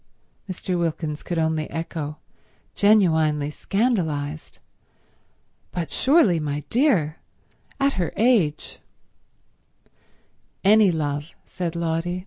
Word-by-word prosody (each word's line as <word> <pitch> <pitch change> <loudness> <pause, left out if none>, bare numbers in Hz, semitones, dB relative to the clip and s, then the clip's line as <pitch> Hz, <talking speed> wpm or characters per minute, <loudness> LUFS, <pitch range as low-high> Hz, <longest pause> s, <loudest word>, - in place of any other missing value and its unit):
"Love?" 185 -2 -5
Mr. 180 -2 -1
Wilkins 160 -2 -2
could 175 - -4
only 160 -1 0
echo, 160 -2 -5 0.6
genuinely 160 -8 +3
scandalized. 160 - -2 1.1
"But 175 -3 -4
surely, 260 - +3
my 145 -1 -3
dear—at 250 - -1
her 175 -3 -2
age—" 210 -10 +1 1.8
"Any 210 0 +6
love," 145 -2 -2 0.2
said 175 -2 -4
Lotty. 170 +1 -2
165 Hz, 90 wpm, -23 LUFS, 155-195 Hz, 1.8 s, Any